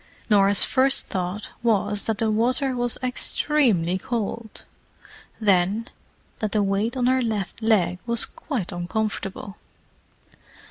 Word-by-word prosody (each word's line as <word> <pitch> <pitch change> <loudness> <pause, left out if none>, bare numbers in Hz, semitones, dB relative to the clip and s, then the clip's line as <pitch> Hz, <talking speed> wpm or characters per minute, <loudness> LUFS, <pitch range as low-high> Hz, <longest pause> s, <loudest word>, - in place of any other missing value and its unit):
Norah's 200 -1 +6
first 265 0 +2
thought 185 +3 -4
was 210 -3 +1
that 225 -2 -1
the 220 0 0
water 250 +4 +1
was 245 -1 -1
extremely 245 - +1
cold; 230 0 -5 0.8
then, 200 +2 +1 0.5
that 215 -2 -2
the 210 -2 +2
weight 200 +6 -1
on 245 - 0
her 260 +1 +2
left 220 -3 -3
leg 195 -5 +2
was 235 0 +2
quite 245 - -5
uncomfortable. 195 +2 -4
215 Hz, 120 wpm, -23 LUFS, 195-240 Hz, 0.8 s, Norah's